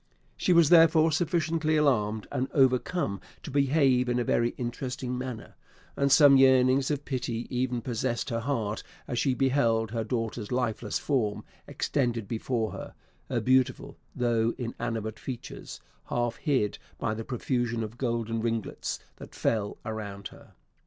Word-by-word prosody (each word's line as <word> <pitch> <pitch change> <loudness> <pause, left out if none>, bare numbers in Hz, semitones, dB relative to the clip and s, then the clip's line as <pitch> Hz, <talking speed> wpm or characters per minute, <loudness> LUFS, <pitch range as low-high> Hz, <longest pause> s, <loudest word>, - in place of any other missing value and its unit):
She - - 0
was 170 -4 +6
therefore 165 -1 +6
sufficiently 160 -1 +1
alarmed 110 -8 +1
and 130 - -1
overcome 130 - +2 0.2
to - - -7
behave 135 -2 +3
in 120 - +1
a 120 - +1
very 120 +1 +1
interesting 125 +1 -4
manner; 125 -3 -6 0.4
and 140 0 +1
some 140 -1 +8
yearnings 130 0 +5
of 145 -1 -2
pity 120 -3 -3
even 125 -2 -1
possessed 120 +1 -2
her 115 - 0
heart 115 -4 -2 0.3
as 120 - -2
she 135 -3 +1
beheld 115 -5 +2
her 115 -1 -1
daughter's 115 -1 -3
lifeless 120 -4 -1
form 120 -8 -1 0.2
extended 120 -6 -1
before 115 0 -2
her - - -8 0.3
her - - 0
beautiful, 130 0 +1 0.2
though 115 -1 +1
inanimate 115 -3 -4
features, 125 -3 -7 0.3
half 120 -1 -1
hid 130 -10 0 0.2
by 110 - -1
the 110 +1 -5
profusion 120 -1 -1
of 110 +2 -8
golden 115 -3 -1
ringlets 115 -1 -2 0.2
that - - -11
fell 105 -3 -1
around 100 -3 -5
her. - - -17
125 Hz, 145 wpm, -28 LUFS, 115-135 Hz, 0.4 s, some